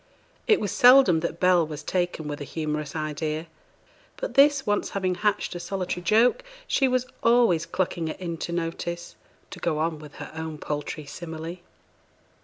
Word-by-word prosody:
It 435 - +5
was 205 - -2
seldom 245 -9 +7
that 170 0 -4
Bell 180 -2 +5
was 150 -1 -7
taken 175 -2 -1
with 145 0 -5
a - - -2
humorous 150 0 -4
idea; 155 +1 -3 0.7
but - - -4
this 280 0 +5
once 205 -1 0
having 185 -2 0
hatched 205 +3 0
a 175 - -5
solitary 180 0 -3
joke, 225 - +3 0.2
she 270 - +2
was 255 -1 +1 0.2
always 230 -9 +4
clucking 170 -1 -1
it 160 - -5
into 170 -2 -4
notice 170 0 -4 0.4
to - - -8
go 165 -3 0
on 160 0 -1
with 150 -1 -12
her 145 - -8
own 160 -1 -5
poultry 150 0 -4
simile. 160 +3 -7
170 Hz, 165 wpm, -26 LUFS, 155-205 Hz, 0.7 s, seldom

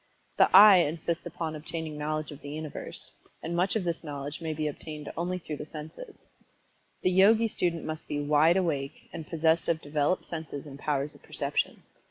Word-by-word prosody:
The - - +6
"I" 200 0 +10
insists 170 0 -1
upon 160 -2 -4
obtaining 160 0 -4
knowledge 155 +1 -3
of 145 - -10
the 145 - -8
Universe, 155 0 -7 0.3
and 170 +1 -3
much 180 +4 +2
of 220 - 0
this 170 -1 -2
knowledge 145 0 -5
may 160 -1 -2
be 155 0 -2
obtained 150 0 -6
only 180 +2 -2
through 155 -4 -6
the 150 - -6
senses. 155 - -9 0.9
The 185 - +3
Yogi 215 +5 +5
student 175 -6 -1
must 155 0 -5
be 145 - -2
"wide 150 +4 +4
awake" 150 -6 -2
and 155 - -7
possessed 160 0 +2
of 165 -1 +2
developed 150 +3 0
senses 160 -4 -6
and 140 -1 -10
powers 145 -1 -1
of - - -18
Perception. - - -2
155 Hz, 185 wpm, -28 LUFS, 150-170 Hz, 0.9 s, I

